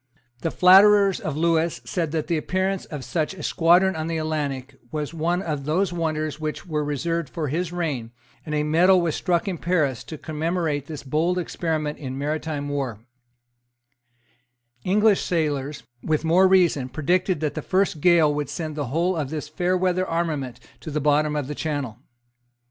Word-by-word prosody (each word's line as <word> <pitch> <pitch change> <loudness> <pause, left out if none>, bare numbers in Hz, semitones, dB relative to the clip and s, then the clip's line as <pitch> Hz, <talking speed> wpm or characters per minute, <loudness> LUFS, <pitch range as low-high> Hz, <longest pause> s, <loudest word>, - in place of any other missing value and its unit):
The 165 - 0
flatterers 195 +2 +6
of 150 -2 -4
Lewis 165 0 +1
said 165 -4 -2
that 155 -2 -1
the 170 - 0
appearance 185 +4 -1
of 150 -5 -7
such 160 +5 -2
a - - -9
squadron 180 +3 +3
on 160 0 -3
the 165 -1 -2
Atlantic 140 -4 -3
was 150 0 -3
one 170 +3 0
of 150 -5 -3
those 175 +5 +1
wonders 155 -3 -2
which 155 -1 -4
were 155 -3 -1
reserved 150 +2 -2
for 150 +1 -3
his 170 +4 -2
reign; 150 -10 -3 0.3
and 150 - -4
a 150 - +1
medal 175 +5 +4
was 170 -3 0
struck 175 0 0
at 180 -4 -3
Paris 155 -9 0
to 155 - -7
commemorate 155 -2 -2
this 155 -4 -7
bold 160 +6 0
experiment 160 -3 -2
in 130 -2 -5
maritime 150 0 -3
war, 130 -6 -4 1.8
English 210 +2 +3
sailors, 150 -5 -1 0.2
with 155 0 -1
more 180 +4 +5
reason, 175 -8 +3
predicted 175 +6 0
that 150 -2 -1
the - - -4
first 190 -4 0
gale 165 -4 +5
would 145 -2 -3
send 155 -3 -4
the 145 -3 -3
whole 170 +8 0
of 150 -5 -2
this 150 -1 -4
fairweather 180 +2 0
armament 155 -7 -2 0.2
to - - -8
the 150 0 -1
bottom 150 +1 +2
of 145 -2 -1
the 150 - -4
Channel. 145 -7 -3
155 Hz, 170 wpm, -24 LUFS, 150-175 Hz, 1.8 s, flatterers